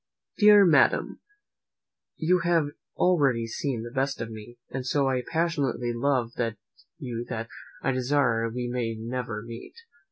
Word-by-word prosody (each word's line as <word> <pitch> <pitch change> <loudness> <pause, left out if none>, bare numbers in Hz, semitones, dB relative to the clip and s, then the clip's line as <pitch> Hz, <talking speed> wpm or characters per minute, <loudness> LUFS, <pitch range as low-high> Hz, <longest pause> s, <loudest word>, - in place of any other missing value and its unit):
"DEAR 210 -1 +8
MADAM, 165 - +3 1.0
"You 180 +3 +2
have 170 -3 +2 0.3
already 140 -10 +2
seen 115 +1 -3
the 120 - -7
best 135 +1 -1
of 115 0 -5
me, 110 +2 -10
and 135 - -3
I - - -3
so 130 -1 +1
passionately 145 -8 0
love 120 -1 0 0.7
you 120 -2 -5
that 115 -1 -4 0.3
I 135 - +2
desire 125 -3 +1
we 120 +1 -4
may 120 -2 -2
never 115 -1 -4
meet. 115 0 -10
125 Hz, 135 wpm, -27 LUFS, 115-145 Hz, 1.0 s, DEAR